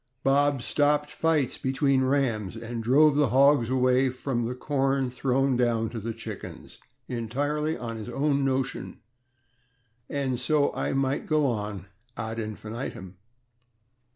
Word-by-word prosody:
Bob 140 -1 +2
stopped 150 0 +1
fights 155 -5 0
between 135 0 +1
rams, 125 -7 0
and 115 0 -5
drove 140 +6 +5
the 145 -2 +3
hogs 135 -2 +4
away 130 0 +3
from 125 -2 -2
the 125 - -4
corn 135 -1 0
thrown 130 +1 +1
down 115 -2 +1
to 115 - -5
the 115 +2 -4
chickens, 110 -2 -9 0.3
entirely 145 +7 -2
on 115 -2 -5
his 110 +2 -7
own 140 +2 +1
notion, 135 0 -2 1.1
and 135 -3 -1
so 145 +2 +2
I - - -2
might 135 +1 -1
go 155 -1 +2
on 105 -6 -2 0.3
ad 110 +1 -4
infinitum. 110 -3 -6
130 Hz, 130 wpm, -27 LUFS, 115-140 Hz, 1.1 s, drove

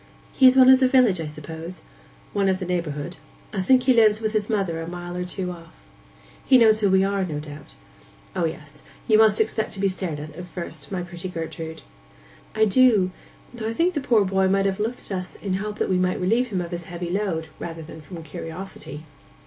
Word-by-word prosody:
'He 260 - +6
is 255 +1 +6
one 260 0 +8
of 260 - +7
the 260 - +4
village, 250 -9 +4
I 160 - -4
suppose?' 160 +4 -8 0.5
'One 200 -1 +2
of 190 - +1
the 185 - -5
neighbourhood. 170 -2 -3 0.4
I 195 - -1
think 255 +7 +4
he 255 0 +5
lives 215 -2 +5
with 220 -1 -2
his 210 -1 0
mother 190 -7 -1
a 165 - -6
mile 175 0 -6
or 180 - -2
two 180 0 -4
off.' 165 -2 -13 0.6
'He 260 - +6
knows 220 -3 +5
who 205 -2 +2
we 190 0 +4
are, 195 0 0
no 160 -5 -3
doubt?' 150 -1 -11 0.6
'O 180 -3 +1
yes. 155 -2 -7 0.3
You 215 -1 +5
must 215 -1 +5
expect 220 0 0
to 195 - -6
be 200 - +2
stared 185 -5 -3
at 150 +1 -7
just 155 +3 -12
at 180 - -7
first, 165 -5 -8
my 185 -2 -2
pretty 175 +1 -7
Gertrude.' 160 -1 -6 0.7
'I 220 - +4
do,—though 220 0 +1
I 225 - -3
think 350 +6 +2
the 295 - -2
poor 235 -6 +3
boy 190 0 +2
may 195 +1 +2
have 195 -1 -1
looked 225 +4 -2
at - - 0
us 180 - -9
in 200 - -5
the 185 - +1
hope 210 +1 -5
we 185 - +1
might 185 0 0
relieve 225 +7 +2
him 195 -6 -2
of 170 0 -6
his 175 -1 -5
heavy 175 0 -5
load, 180 -5 -2
rather 165 -1 -6
than 160 0 -11
from 165 +2 -9
curiosity. 160 -1 -8
185 Hz, 225 wpm, -24 LUFS, 165-215 Hz, 0.7 s, one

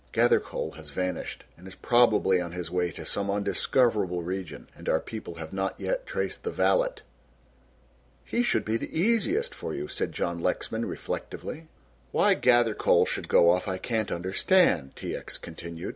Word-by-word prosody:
Gathercole - - +2
has 80 -2 -11
vanished 90 +5 -3
and 90 +3 -14
is 95 - -10
probably 110 -6 +4
on 85 -1 -5
his 90 -2 -5
way 90 -1 +1
to 80 - -9
some 100 0 -1
undiscoverable 100 -2 +1
region, 95 0 -5
and - - -6
our 80 - +3
people 110 -5 -7
have 80 0 -8
not 95 0 -2
yet - - -2
traced 485 -2 -3
the 450 - -2
valet." - - +1 1.2
"He 240 - 0
should 240 - +1
be 110 +1 +1
the 160 - -4
easiest 290 - +2
for - - -5
you," 365 +1 -4
said 420 +3 -2
John - - -2
Lexman, - - -1
reflectively. 160 +1 -5 0.4
"Why - - +4
Gathercole 120 -3 +4
should - - -3
go 85 - +6
off 90 +1 0
I 95 - -1
can't 110 0 -2
understand," 95 - +2
T. - - -4
X. - - -7
continued. 85 0 -7
100 Hz, 165 wpm, -27 LUFS, -, 1.2 s, go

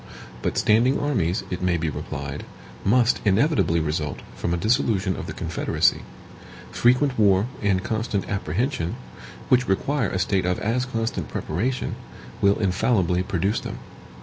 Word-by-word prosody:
But - - -2
standing 115 +5 +3
armies, 95 - 0
it 90 - -3
may 90 -1 +2
be 80 0 -2
replied, 70 +1 -5 0.4
must 120 +4 +3
inevitably 105 - +3
result 75 -1 -2
from 85 - -2
a 85 - +1
dissolution 100 -2 +1
of - - -6
the - - -4
Confederacy. - - 0 0.7
Frequent 125 +1 +2
war 100 -1 +4 0.2
and 95 -2 +1
constant 110 -2 -2
apprehension, 95 - -1 0.5
which 125 0 +4
require 120 +5 0
a - - -2
state 95 0 +1
of 90 - +1
as 125 +4 -1
constant 115 -3 -2
preparation, 120 +11 -2 0.5
will 100 0 +4
infallibly 95 -2 +1
produce 95 +3 0
them. - - -6
100 Hz, 140 wpm, -24 LUFS, 90-120 Hz, 0.7 s, war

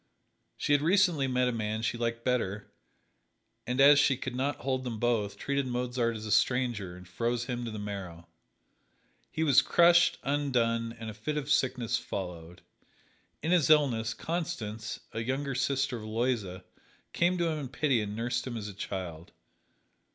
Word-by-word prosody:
She 145 - +1
had 145 - +4
recently 170 -4 +3
met 125 -1 +1
a - - +1
man 110 -1 -2
she 115 - 0
liked 115 0 -3
better, 105 -5 -1 1.0
and 125 +2 -1
as 140 +1 +8
she 140 -3 +3
could 130 - -5
not 135 +3 -2
hold 130 0 -1
them 120 -3 -4
both, 110 -3 0
treated 140 -1 -1
Mozart 125 -1 -1
as 110 0 -6
a 110 - -4
stranger, 115 -5 +1
and 90 -1 -13
froze 120 +5 -1
him 120 0 -3
to - - -3
the 110 - -6
marrow. 95 -5 -6 1.0
He 160 - -2
was 145 -5 +6
crushed, 175 0 +5
undone, 120 -5 0
and 110 -1 -6
a - - -10
fit 115 +9 -4
of 145 0 -3
sickness 130 -5 +1
followed. 90 -3 -7 0.8
In 160 - 0
his 175 -5 +4
illness, 125 -7 +3
Constance, 120 -11 -4
a 115 - -3
younger 135 +4 -2
sister 130 0 0
of 110 - -8
Aloysia, 110 -5 -2 0.5
came 175 +1 +2
to 170 -1 +1
him 155 -1 -2
in 135 -3 -5
pity 135 -3 +1
and 105 0 -4
nursed 120 +2 -2
him 120 -2 -4
as 105 -2 -5
a 100 - -7
child. 90 -4 -6
120 Hz, 175 wpm, -30 LUFS, 110-140 Hz, 1.0 s, as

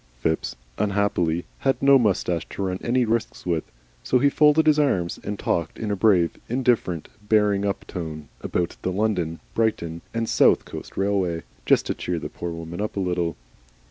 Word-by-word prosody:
Phipps, 80 +5 -1 0.2
unhappily, 100 -5 +1
had 135 -1 +1
no 140 0 +6
moustache 90 -7 0
to 100 - -4
run 95 -1 -2
any 125 +1 +2
risks 115 0 -2
with, 85 -3 0 0.4
so 125 - +2
he 140 +3 +3
folded 150 +2 +5
his 155 -1 +5
arms 90 -13 +1
and 105 0 -3
talked 85 -4 -1
in 110 -2 -3
a - - +1
brave, 95 -4 +3
indifferent, 120 - +1 0.2
bearing 105 -2 +3
up 100 - -3
tone 80 -4 -6
about 85 -1 -2
the 95 - -1
London, 90 -5 0
Brighton, 85 -8 -1
and 115 0 -2
South - - +4
Coast - - -9
Railway, 95 -4 0 0.2
just - - +4
to - - -1
cheer 90 - -3
the - - -5
poor 85 - -5
woman 85 +2 -6
up 105 -1 -3
a - - +1
little. 90 -3 -1
95 Hz, 175 wpm, -24 LUFS, 85-110 Hz, 0.4 s, no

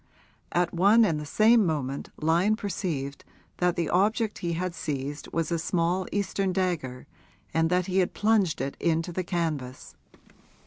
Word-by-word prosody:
At 175 0 +1
one 205 +6 +5
and 160 -6 0
the 150 - -7
same 220 +7 +5
moment 140 -6 -2
Lyon 170 +7 +2
perceived 170 -10 -4 0.3
that 180 -1 +1
the 170 -2 -1
object 210 +4 +1
he 170 -1 -2
had 180 +1 -2
seized 145 -2 -4
was 165 0 -1
a 170 - 0
small 175 +2 0
Eastern 195 -1 -1
dagger 175 -9 -2 0.5
and 160 +1 +2
that 180 0 +2
he 190 +1 +1
had 180 - 0
plunged 210 - +2
it 135 +1 -3
into 165 +1 0
the 185 +2 -2
canvas. 155 -8 -3
175 Hz, 155 wpm, -27 LUFS, 155-190 Hz, 0.5 s, one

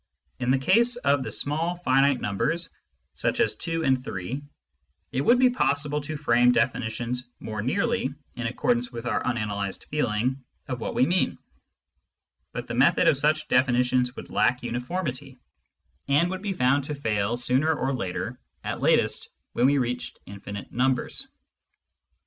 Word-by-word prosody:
In 125 -1 -1
the 135 - +4
case 230 - +3
of 145 - +2
the - - -4
small 160 +4 -1
finite 135 -5 +3
numbers, 165 - -1 0.4
such - - -1
as - - +2
2 165 0 -2
and 130 -3 +2
3, 115 +5 -4 0.7
it 130 - 0
would 240 - +5
be 255 0 +5
possible 145 - 0
to 155 +1 -5
frame 125 -3 +4
definitions 120 +1 -1
more 110 -1 -4
nearly 200 - 0 0.2
in 120 -1 -3
accordance 120 +1 0
with 120 -1 -7
our 120 - 0
unanalysed 105 -5 -2
feeling 130 -1 0 0.2
of 125 -2 -3
what - - -3
we 130 - +4
mean; 180 +4 +1 1.1
but - - -5
the - - -5
method - - +4
of - - +6
such 155 +1 +1
definitions 125 0 +2
would - - -9
lack 125 0 +2
uniformity, 130 +2 -4 0.7
and 150 +6 +3
would 185 0 -4
be 200 -1 -2
found 135 -3 +2
to 150 - -2
fail 110 -4 0
sooner 130 +6 +2
or 140 -3 -1
later 95 -8 -3
— - - -45
at - - -4
latest - - +2 0.2
when 125 - +3
we 140 +1 +3
reached 125 -1 -2
infinite 100 0 -8
numbers. 125 +1 0
130 Hz, 155 wpm, -26 LUFS, 120-150 Hz, 1.1 s, of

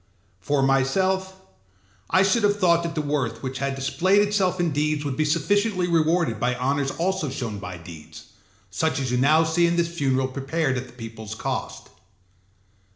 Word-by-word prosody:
For 135 +8 0
myself, 190 +9 +1 0.7
I 185 - +4
should 200 +4 +2
have 205 0 +2
thought 170 -3 +4
that 170 -1 -4
the 155 - -1
worth 145 -5 -2
which 130 0 -4
had 140 0 -2
displayed 185 +9 +2
itself 190 -3 0
in 175 -2 +1
deeds 150 0 -1
would 140 -2 -2
be 155 - +1
sufficiently 180 +5 +1
rewarded 165 - +1
by 125 +2 0
honours 135 +2 0
also 170 0 -1
shown 115 -6 -5
by 90 -1 -7
deeds; 85 -2 -12 0.5
such 160 +10 0
as 130 -2 -2
you 125 - +1
now 155 +5 +4
see 165 +2 +2
in 170 - +1
this 170 0 -1
funeral 130 -3 +1
prepared 135 +2 -1
at 125 0 -4
the 120 -2 -9
peopleâs 110 -1 -9
cost. - - -4
150 Hz, 175 wpm, -24 LUFS, 130-175 Hz, 0.7 s, I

